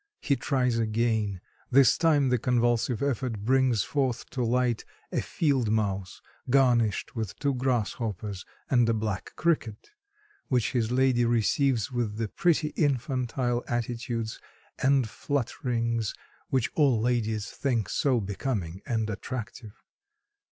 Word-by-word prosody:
He 140 - +1
tries 125 -4 0
again. 110 -3 0 0.3
This 130 -2 +6
time 150 -5 +3
the 125 -1 +2
convulsive 120 0 +1
effort 125 -5 -1
brings 130 -4 +3
forth 130 -4 -1
to 125 - -1
light 120 0 +1 0.3
a - - 0
field 135 -8 0
mouse, 100 -4 -1 0.3
garnished 120 -4 +2
with 110 -4 -3
two 140 -1 0
grasshoppers 110 -6 -2 0.2
and 120 -3 +3
a 115 - +2
black 105 -4 -3
cricket, 150 - -1 0.6
which 125 -4 +1
his 115 -4 0
lady 130 -1 +3
receives 120 +1 +1
with 115 -4 -2
the 115 -1 -1
pretty 165 - +1
infantile 125 -4 0
attitudes 120 -1 -3 0.4
and 135 -2 +3
flutterings 115 -3 -2 0.3
which 130 -4 +1
all 140 -7 +3
ladies 110 -2 0
think 120 -6 -1
so 130 -4 +1
becoming 100 -3 -3
and 110 -4 0
attractive. 110 0 -6
120 Hz, 125 wpm, -27 LUFS, 110-130 Hz, 0.6 s, This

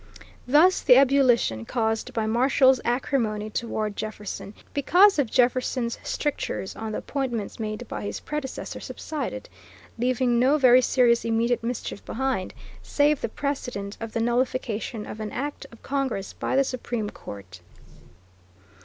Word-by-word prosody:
Thus 315 +8 +5
the 250 - +7
ebullition 255 - +4
caused 220 - -1
by 220 -1 -1
Marshall's 260 +3 +4
acrimony 225 -4 -1
toward 215 -2 -2
Jefferson, 210 -1 -6 0.2
because 355 +6 +5
of 265 -6 +1
Jefferson's 250 -1 +1
strictures 290 -9 -3
on 220 -1 -5
the - - -2
appointments 245 -8 -3
made 215 +2 -4
by - - -5
his 205 - -4
predecessor 300 -3 -5
subsided, 275 -4 -5 0.5
leaving 245 0 +2
no 265 +5 +4
very 255 -3 +6
serious 240 -2 +3
immediate 230 +1 +1
mischief 230 -3 -4
behind, 260 -7 -2 0.3
save 290 0 +2
the - - -2
precedent 245 -7 -4
of 225 -1 -6
the 230 - 0
nullification 235 -2 -1
of 215 - -8
an 215 -1 -4
act 290 +2 -4
of 230 - -16
Congress 265 -8 -2
by - - -2
the 275 - +5
Supreme 240 -5 -3
Court. 95 -3 -10
245 Hz, 135 wpm, -25 LUFS, 220-265 Hz, 0.5 s, the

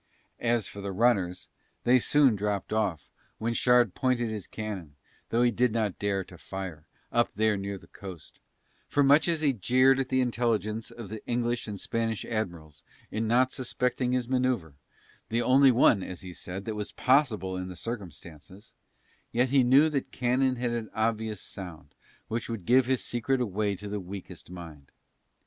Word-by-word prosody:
As 120 -3 +1
for 100 - -8
the 100 0 -3
runners 95 -4 +1 0.4
they 125 +1 +5
soon 135 -2 +4
dropped 105 0 -2
off 95 -10 -1 0.3
when 115 +1 -1
Shard 120 -4 +4
pointed 120 -3 0
his 105 -4 -5
cannon 95 -9 -6 0.3
though 120 +1 +2
he 120 - +4
did 120 +1 +2
not 105 -4 -1
dare 100 -1 0
to 90 -2 -15
fire, 95 -6 -7 0.2
up 120 0 +2
there 110 0 +2
near 100 0 -4
the - - -15
coast; 90 -6 -11 0.5
for 145 - +2
much 145 +4 +5
as 165 -2 +1
he 145 -3 +3
jeered 130 +5 +4
at 130 -1 -1
the 130 - +2
intelligence 115 -3 0
of 115 -5 -9
the 110 0 -7
English 120 0 -1
and 105 -2 -5
Spanish 115 0 -2
Admirals 85 -9 -4 0.3
in 110 +1 -1
not 125 +3 +3
suspecting 125 -1 -1
his 125 -2 0
manoeuvre, 125 - 0 0.6
the 115 +2 +1
only 135 +3 +6
one 115 -4 +5
as 90 -1 -6
he 90 -1 -8
said 95 +3 -7
that 110 - -3
was 105 -1 -4
possible 115 - +2
in 90 0 -4
the 90 - -8
circumstances, 90 - -8 0.6
yet 125 +2 +2
he 135 0 +5
knew 135 +5 +6
that 145 -4 -2
cannon 130 +1 +1
had 120 -1 -1
an 115 -2 -3
obvious 110 -1 -1
sound 80 -7 -9 0.3
which 115 +1 -3
would 110 -6 -5
give 125 +3 +4
his 130 -1 +1
secret 125 +3 0
away 105 -3 0
to 105 +3 -8
the 105 0 -3
weakest 95 -2 -9
mind. 80 -6 -10
110 Hz, 175 wpm, -28 LUFS, 95-125 Hz, 0.6 s, only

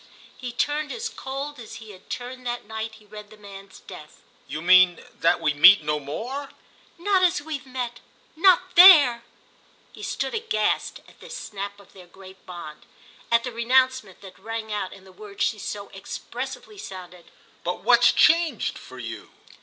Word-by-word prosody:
He 250 -2 -7
turned 290 +4 -1
as 460 0 -4
cold 275 - -6
as 230 - -10
he 220 -2 -11
had 190 -1 -17
turned 250 +1 -6
that 240 -2 -4
night 220 +1 -6
he 215 - -19
read 210 0 -11
the 215 - -16
man's 195 -2 -13
death. 155 -5 -13 0.2
"You 155 - -5
mean 180 0 +5
that 170 +1 +3
we 150 - +1
meet 170 +4 +7
no 150 0 -1
more?" 245 - -6 0.5
"Not 380 +2 +1
as 360 -4 +3
we've 290 -3 -7
met—not 325 +9 0
there!" 295 -11 +8 0.7
He - - -13
stood - - -3
aghast 430 - -1
at - - -20
this 485 0 -9
snap 200 - -7
of 200 - -19
their 185 -2 -15
great 190 +1 -15
bond, 170 -4 -10 0.4
at 230 0 +4
the 250 - -4
renouncement 250 -3 +1
that 190 -2 -13
rang 220 +1 -5
out 200 -3 -3
in 195 - -14
the 190 - -16
word 200 +1 -13
she 215 - 0
so 200 0 -6
expressively 385 - -8
sounded. 180 - -10 0.4
"But 180 +1 -4
what's 240 +2 +5
changed—for 335 0 +1
you?" - - -8
220 Hz, 165 wpm, -24 LUFS, 190-270 Hz, 0.7 s, there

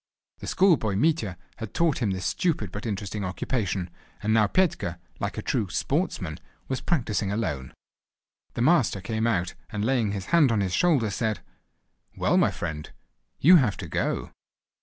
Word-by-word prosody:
The - - -8
schoolboy 155 - +3
Mitya 125 - +1 0.2
had 110 -3 -7
taught 165 -4 +2
him 110 - +1
this 95 -1 -3
stupid 155 - 0
but 105 +4 -5
interesting 100 0 -3
occupation, 95 -2 -2 0.3
and 110 +1 +2
now 110 -2 +5
Petka, 150 - +1 0.2
like - - -3
a - - -3
true 100 -5 0
"sportsman," 95 - -1 0.3
was 130 - -2
practising 110 - 0
alone. 85 - -2 0.8
The 120 - 0
master 130 - +3
came 110 +3 -1
out, 90 -6 0 0.2
and 105 -2 -2
laying 120 -5 +1
his 95 -2 -5
hand 150 -7 +6
on 110 - +2
his 95 -2 -1
shoulder, 145 - +3
said: 110 -4 -1 0.8
"Well, - - +2
my - - +4
friend, 75 -1 -5 0.5
you 180 +5 +8
have 120 -10 +2
to - - -6
go!" - - -2
110 Hz, 160 wpm, -26 LUFS, 95-135 Hz, 0.8 s, you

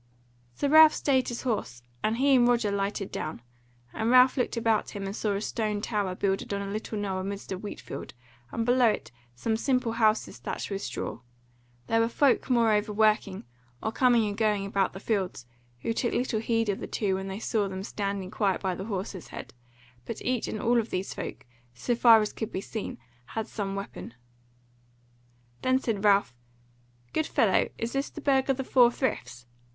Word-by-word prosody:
So 285 - 0
Ralph 315 +1 +8
stayed 260 -3 +2
his 240 - -4
horse, 210 - -2 0.2
and 220 +1 +1
he 275 +2 +4
and 245 -2 +5
Roger 235 -4 +2
lighted 200 0 -2
down, 155 -6 -5 0.5
and 220 +1 -1
Ralph 255 +1 +6
looked 245 -2 -1
about 225 -2 +1
him 200 - -4
and 195 +1 -4
saw 210 -2 -1
a 200 - -2
stone 215 -2 -1
tower 205 -4 -1
builded 195 +1 -1
on 200 - -3
a 200 - -5
little 215 +1 -4
knoll 195 -2 -2
amidst 195 +1 -5
a - - 0
wheatfield, 205 -9 -7 0.4
and 230 - -1
below 245 0 +4
it - - -3 0.2
some 220 - -1
simple 250 0 +1
houses 220 -1 +1
thatched - - -5
with 195 0 -2
straw; - - -4 0.7
there 225 - +2
were 230 - +3
folk 270 +1 +2
moreover 220 -3 +3
working, 210 -2 +2 0.4
or 220 - 0
coming 240 -2 +4
and 205 0 -4
going 210 -3 +1
about 195 -1 0
the 190 - -7
fields, 195 - -2 0.4
who 230 - -1
took 240 +1 -1
little 240 -3 0
heed 225 0 0
of 200 - -1
the - - -5
two 200 -3 -1
when 190 +1 -3
they 190 0 -4
saw 215 -1 0
them 190 0 -5
standing 200 -2 -3
quiet 195 -3 +1
by 190 -2 -1
the 190 +2 -6
horse's 195 -4 -5
head; - - -9 0.5
but 225 - -5
each 250 -1 0
and 215 - -4
all 235 +2 +3
of 230 - -3
these 185 +1 -3
folk, - - -6 0.3
so 240 - -1
far 230 -1 +7
as 210 - -2
could 220 - -4
be - - -2
seen, 215 +2 -5 0.4
had 220 - 0
some 195 -2 -4
weapon. 195 -11 -7 1.5
Then 260 0 +3
said 225 -6 -2
Ralph: 200 - +4 0.8
"Good 315 - 0
fellow, - - +2
is 230 +1 -3
this 275 +1 -1
the - - -9
Burg 275 -2 +2
of 270 - +2
the 265 - -2
Four 250 -2 +5
Friths?" 235 - -3
215 Hz, 195 wpm, -28 LUFS, 195-240 Hz, 1.5 s, Ralph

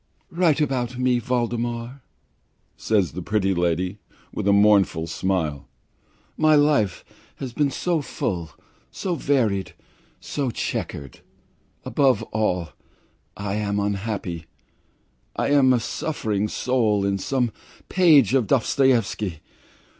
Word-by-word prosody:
"Write 165 -3 +2
about 125 -4 -1
me, 125 -1 +2
Voldemar!" 120 +1 -2 0.7
says 100 -5 +1
the 90 - -6
pretty 95 +1 0
lady, 90 +3 -1 0.3
with - - -3
a - - +5
mournful 100 -5 +4
smile. 80 -4 -2 0.7
"My 155 0 +4
life 145 - +2 0.3
has 130 -3 -6
been 145 +2 +1
so 165 +3 -1
full, 85 - -3 0.4
so 185 - -3
varied, 115 - 0 0.4
so 140 -3 -3
chequered. 70 - -4 0.7
Above 135 -6 +2
all, 90 -6 0 0.7
I 100 -1 -3
am 105 -1 -1
unhappy. 100 -4 -3 0.9
I - - 0
am 135 -3 +5
a 125 - +3
suffering 110 -5 -2
soul 110 -4 +1
in 100 0 0
some 125 +1 0 0.4
page 155 - +5
of 130 -6 +2
Dostoevsky. 115 - +1
110 Hz, 110 wpm, -23 LUFS, 95-135 Hz, 0.9 s, a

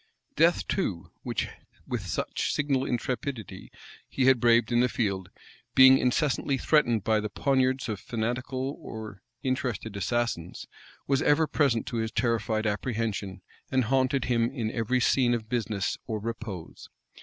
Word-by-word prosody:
Death, 165 +2 +3
too, 100 - -2
which - - -2 0.4
with - - -4
such - - -2
signal 140 -2 0
intrepidity 125 - -4 0.4
he 130 - 0
had 130 -2 +5
braved 115 0 +4
in 120 - +3
the 125 +1 +3
field, 100 -7 -2 0.5
being 130 0 +8
incessantly 135 +1 +1
threatened 120 -9 +2
by 110 +1 +2
the 105 0 -3
poniards 130 +3 +1
of 105 -4 -3
fanatical 130 +4 -3
or 110 -3 -8 0.2
interested 125 -5 -2
assassins, 100 -4 -2 0.4
was 140 0 +1
ever 155 +2 +4
present 140 -7 +1
to 120 - -4
his 110 -1 -1
terrified 110 -2 0
apprehension, 105 -4 -2 0.3
and 130 -1 +2
haunted 130 +2 +1
him 115 -2 +2
in 120 -5 -3
every 120 +2 0
scene 120 -1 +3
of 110 -2 -5
business 110 -5 -1
or 110 - -2
repose. 110 -5 -7
120 Hz, 145 wpm, -28 LUFS, 110-130 Hz, 0.5 s, being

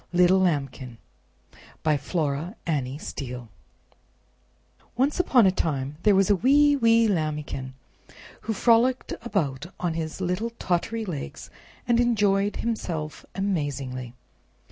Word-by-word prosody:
THE 180 0 +5
LAMBIKIN 140 -10 0 0.9
By 155 -1 +3
Flora 150 - -2
Annie 140 -5 -1
Steel 125 -6 -7 1.5
Once 270 +7 +1
upon 260 - +5
a 190 - +5
time 145 -5 -2
there 205 0 +4
was 195 +1 +4
a - - +5
wee 285 +7 +4
wee 230 -3 +4
Lambikin, 150 -7 -2 0.7
who 220 - -2
frolicked 240 +4 +3
about 170 - -2
on 175 -2 -1
his 160 0 -4
little 185 +5 -1
tottery 220 +6 -1
legs, 150 - -6 0.4
and 240 -1 +3
enjoyed 205 -4 +2
himself 170 -9 -4
amazingly. 140 -10 -3
180 Hz, 115 wpm, -25 LUFS, 145-225 Hz, 1.5 s, THE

